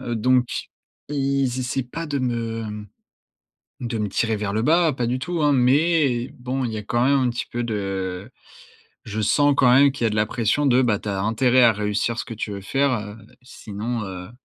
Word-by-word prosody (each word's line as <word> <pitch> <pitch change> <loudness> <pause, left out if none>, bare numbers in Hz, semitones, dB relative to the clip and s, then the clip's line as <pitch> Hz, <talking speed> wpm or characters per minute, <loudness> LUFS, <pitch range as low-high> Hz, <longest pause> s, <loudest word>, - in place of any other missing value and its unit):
Heu, 120 - -4
donc 125 +2 +2 0.6
ils 140 -1 0 0.2
essayent 125 +1 -2
pas 165 +7 -6
de 145 -2 -2
me, 115 -2 -2
mmh 105 -1 -7 0.9
de 120 -2 -3
me 105 -1 -1
tirer 110 +3 0
vers 105 -1 -3
le 110 +2 0
bas, 165 +3 +3
pas 125 -3 -2
du 125 +2 -1
tout 170 +4 -3
hein, 145 -1 +4
mais 135 -1 +2
bon, 130 +1 -3
il 120 - -2
y - - -4
a - - -5
quand 120 +3 0
même 140 +1 +4
un 125 -1 +1
petit 120 +1 -4
peu 120 0 -3
de 95 -2 -4 0.8
je 110 0 -4
sens 145 +7 +3
quand 125 - +5
même 140 +2 +6
qu'il 130 -3 -2
y - - +4
a - - +1
de - - -3
la 105 0 +2
pression 120 +6 0
de 130 -1 +4
«Bah 110 -5 +1
tu 105 - -5
as 95 -1 -2
intérêt 125 +4 +3
à 115 -2 +6
réussir 105 +3 -1
ce - - -2
que 115 - -7
tu 110 -1 -5
veux 100 -1 -6
faire, 135 +6 +1
heu, 105 0 -8 0.2
sinon 115 -1 -5
heu» 90 -1 -8
120 Hz, 225 wpm, -22 LUFS, 105-135 Hz, 0.9 s, même